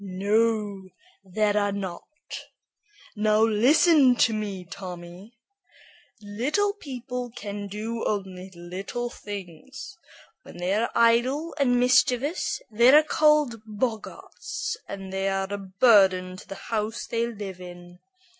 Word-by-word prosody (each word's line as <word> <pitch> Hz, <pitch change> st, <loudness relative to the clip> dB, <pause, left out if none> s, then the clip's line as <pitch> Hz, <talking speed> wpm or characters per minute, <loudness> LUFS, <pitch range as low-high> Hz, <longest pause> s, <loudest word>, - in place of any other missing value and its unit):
"No, 200 Hz, 0 st, 0 dB, 0.3 s
there 205 Hz, +2 st, 0 dB
are 205 Hz, -1 st, +1 dB
not. 190 Hz, -3 st, -5 dB, 1.1 s
Now 215 Hz, +1 st, +3 dB
listen 260 Hz, +5 st, +5 dB
to 230 Hz, -1 st, +3 dB
me, 200 Hz, -4 st, -4 dB
Tommy. 180 Hz, +5 st, -10 dB, 0.9 s
Little 280 Hz, -, 0 dB
people 250 Hz, -, -6 dB
can 205 Hz, -2 st, -6 dB
do 220 Hz, +3 st, -4 dB
only 190 Hz, -2 st, -4 dB
little 190 Hz, +8 st, -5 dB
things. 205 Hz, -, -9 dB, 0.4 s
When -, -, -13 dB
they 180 Hz, +2 st, -1 dB
are 225 Hz, +3 st, +1 dB
idle 240 Hz, +7 st, +2 dB
and 245 Hz, -3 st, +3 dB
mischievous, 255 Hz, +4 st, +2 dB
they 235 Hz, +3 st, +5 dB
are 300 Hz, +2 st, +7 dB
called 300 Hz, -6 st, +2 dB
boggarts, 245 Hz, -, -4 dB
and 195 Hz, -1 st, -7 dB
they 195 Hz, 0 st, 0 dB
are 195 Hz, +1 st, -2 dB
a 205 Hz, -, -3 dB
burden 190 Hz, -2 st, +3 dB
to 185 Hz, -, -13 dB
the 195 Hz, -, -7 dB, 0.2 s
house 220 Hz, +1 st, -2 dB
they 230 Hz, 0 st, -1 dB
live 200 Hz, -5 st, -7 dB
in. 175 Hz, 0 st, -11 dB
215 Hz, 120 wpm, -25 LUFS, 195-245 Hz, 1.1 s, are